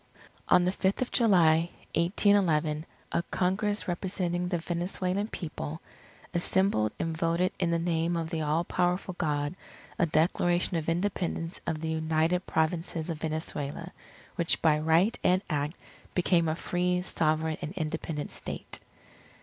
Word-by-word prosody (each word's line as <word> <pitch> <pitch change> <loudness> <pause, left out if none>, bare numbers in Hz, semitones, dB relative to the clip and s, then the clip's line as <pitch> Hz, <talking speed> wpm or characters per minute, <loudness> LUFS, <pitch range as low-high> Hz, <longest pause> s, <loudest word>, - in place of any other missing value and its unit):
On 180 - +6
the 180 - +2
Fifth 190 +4 +1
of 245 - -8
July, 170 -7 +4 0.2
1811, 170 -4 +2 0.2
a - - +1
Congress 205 +3 0
representing 180 -1 -1
the 180 -1 0
Venezuelan 180 +4 -2
People, 160 -4 -5 0.5
assembled 175 - +2
and 165 -1 -2
voted 170 +2 +1
in 175 - +1
the 170 - +2
name 165 0 0
"of 165 0 -3
the 165 -2 -1
all 155 +2 +1
powerful 180 +2 0
God" 145 -1 0 0.5
a 170 - +4
Declaration 175 +3 +2
of 160 -1 -1
Independence 175 -1 -1
of 155 -2 -1
the 160 - -2
United 160 +3 +1
Provinces 160 +1 -1
of 160 - -5
Venezuela, 155 +1 -3 0.5
which 170 -1 +2
by 155 -2 +4
right 165 +8 +3
and 185 +2 +3
act 150 +2 -1 0.4
became 175 -2 +3
a 155 - 0
free, 180 +1 0
sovereign, 155 -2 0
and 155 - -4
independent 155 -3 -3
State. - - -6
170 Hz, 140 wpm, -29 LUFS, 160-180 Hz, 0.5 s, On